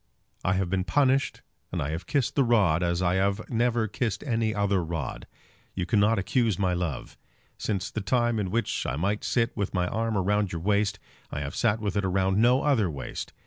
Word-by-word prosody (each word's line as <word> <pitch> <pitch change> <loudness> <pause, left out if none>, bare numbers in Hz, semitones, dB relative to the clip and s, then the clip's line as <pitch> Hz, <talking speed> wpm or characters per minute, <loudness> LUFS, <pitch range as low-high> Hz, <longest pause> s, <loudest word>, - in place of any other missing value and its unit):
I 90 - +2
have 95 0 0
been 95 +1 0
punished, 135 +6 +1 0.3
and - - -2
I 70 - -2
have 80 +2 -5
kissed 140 -1 0
the 140 - +3
rod, 100 -9 +3
as 85 +1 0
I 90 0 +2 0.4
never 120 -1 +1
kissed 110 0 -2
any 115 -5 0
other 100 -3 +1
rod. 80 -5 -4 0.5
You 90 - -1
cannot 105 +3 +3
accuse 110 0 +1
my 95 -2 +1
love. 85 -7 -4 0.4
Since 100 -2 -2
the 110 - -3
time 120 +3 +1
in 95 -3 -1
which 115 +2 -1
I 65 - -1
might 100 +7 -1
sit 115 -1 0
with 100 -2 -2
my 90 -1 +1
arm 115 -1 -1
round 100 0 +1
your 85 - -3
waist, 105 +2 +1 0.3
I 75 - -4
have 70 +1 -5
sat 110 -2 +2
with 105 -2 -2
it 100 - +2
round 95 +1 +1
no 125 +3 +4
other 120 -11 +2
waist. 70 -4 -6
100 Hz, 200 wpm, -27 LUFS, 90-115 Hz, 0.5 s, no